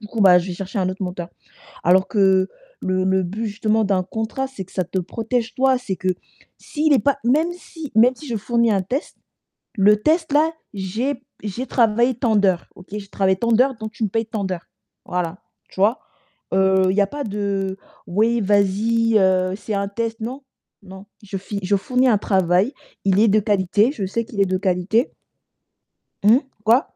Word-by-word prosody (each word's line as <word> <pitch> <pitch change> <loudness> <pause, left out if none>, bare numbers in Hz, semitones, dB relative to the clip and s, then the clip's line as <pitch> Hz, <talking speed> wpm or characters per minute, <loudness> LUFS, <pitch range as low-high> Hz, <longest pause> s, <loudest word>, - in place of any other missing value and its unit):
Du 210 - -9
coup, 225 - -4
bah, 180 -3 +7
je 175 - -4
vais 180 - -4
chercher 195 +3 -5
un 185 -1 +1
autre 185 +1 -5
monteur. 180 -1 -4 0.6
Alors 185 +2 +4
que 190 -2 +3 0.3
le 185 0 0
le 190 0 +2
but 210 +6 -4
justement 215 +1 0
d'un 190 -2 +1
contrat, 220 +7 -3
c'est 255 -8 -7
que - - -22
ça 185 - -1
te 185 +2 -3
protège 225 +5 -3
toi, 260 0 +3
c'est 225 -7 -4
que, 185 - -2 0.5
s'il 305 -1 0
est 265 - +5
pas 280 -1 +1
même 305 +8 +2
si 325 -4 -10
même 245 +3 +5
si 300 - -11
je 235 - -2
fournis 235 +1 +1
un 195 -2 +2
test 260 +10 -4 0.6
le 210 0 +5
test 320 +4 +1
là, 310 +2 +4 0.2
j'ai 215 +9 -2 0.3
j'ai 230 +6 -4
travaillé 235 +1 +2
tant 230 -2 0
d'heures. 190 -4 +2
OK, 180 - -15
j'ai 205 -1 -6
travaillé 190 -1 +1
tant 235 +3 0
d'heures 255 +4 +4
donc 220 0 -7
tu 230 - -9
me - - +1
paies 225 +3 -1
tant 215 -2 -4
d'heures. 185 -3 -4 0.4
Voilà, 180 0 -3 0.3
tu - - -17
vois? 220 +5 +3 0.5
Heu, 190 0 +3
il 190 - -1
y - - +4
a 200 - +4
pas 290 +6 -5
de: 200 -2 -2 0.3
«Oui 225 +6 +1
vas-y, 210 +3 +2
heu, 185 -1 +2
c'est 210 0 -5
un 200 0 -1
test». 225 +2 -3
Non, 255 +5 -5 0.4
non. 190 +1 -12 0.2
Je 200 -1 -6
fi 200 +1 -5
je 200 +2 +2
fournis 250 +6 +1
un 215 -4 +4
travail, 190 +4 +2 0.3
il 195 +1 +3
est 225 - +5
de 210 +1 +4
qualité, 205 +4 +2
je 205 -9 -4
sais 230 +5 -2
qu'il 205 -2 -6
est 195 - +4
de 185 0 0
qualité. 190 +5 0 1.1
Mmh? 225 +5 +6 0.2
Quoi? 230 +4 +5
205 Hz, 200 wpm, -21 LUFS, 190-235 Hz, 1.1 s, bah